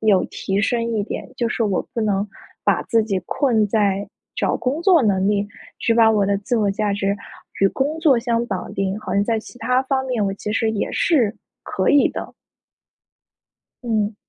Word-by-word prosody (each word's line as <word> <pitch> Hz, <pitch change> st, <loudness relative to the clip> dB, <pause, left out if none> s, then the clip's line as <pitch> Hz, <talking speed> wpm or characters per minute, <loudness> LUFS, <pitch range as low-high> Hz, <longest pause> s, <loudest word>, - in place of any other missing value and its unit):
有 205 Hz, -4 st, +3 dB
提 195 Hz, +1 st, -2 dB
升 230 Hz, +3 st, +1 dB
一 210 Hz, -, +1 dB
点， -, -, -6 dB
就 235 Hz, -, 0 dB
是 235 Hz, -, -1 dB
我 200 Hz, -4 st, +1 dB
不 230 Hz, -, -1 dB
能 205 Hz, -1 st, 0 dB, 0.4 s
把 -, -, +2 dB
自 230 Hz, -2 st, +2 dB
己 195 Hz, -4 st, -1 dB
困 240 Hz, -7 st, +2 dB
在 200 Hz, -2 st, +1 dB, 0.3 s
找 -, -, +1 dB
工 275 Hz, +6 st, -2 dB
作 360 Hz, -3 st, +5 dB
能 195 Hz, -3 st, +2 dB
力， 205 Hz, -1 st, +1 dB, 0.3 s
只 230 Hz, -, +1 dB
把 225 Hz, -1 st, +6 dB
我 210 Hz, -3 st, +2 dB
的 200 Hz, 0 st, +2 dB
自 240 Hz, +5 st, -1 dB
我 205 Hz, -2 st, +2 dB
价 205 Hz, +1 st, -1 dB
值 200 Hz, 0 st, 0 dB, 0.4 s
与 195 Hz, -, +5 dB
工 285 Hz, +9 st, -2 dB
作 290 Hz, -7 st, +4 dB
相 235 Hz, 0 st, 0 dB
绑 190 Hz, -5 st, -4 dB
定， 195 Hz, +1 st, -1 dB
好 215 Hz, -, -4 dB
像 200 Hz, +1 st, +3 dB
在 225 Hz, 0 st, 0 dB
其 245 Hz, -, -14 dB
他 250 Hz, +3 st, +1 dB
方 265 Hz, 0 st, -1 dB
面 245 Hz, -5 st, 0 dB
我 195 Hz, -, -2 dB
其 210 Hz, +1 st, -4 dB
实 225 Hz, 0 st, +1 dB
也 215 Hz, -2 st, -2 dB
是 240 Hz, -11 st, +2 dB, 0.3 s
可 -, -, -1 dB
以 290 Hz, -, +5 dB
的。 -, -, -6 dB, 1.5 s
嗯。 220 Hz, -3 st, 0 dB
220 Hz, 210 characters per minute, -21 LUFS, 200-240 Hz, 1.5 s, 把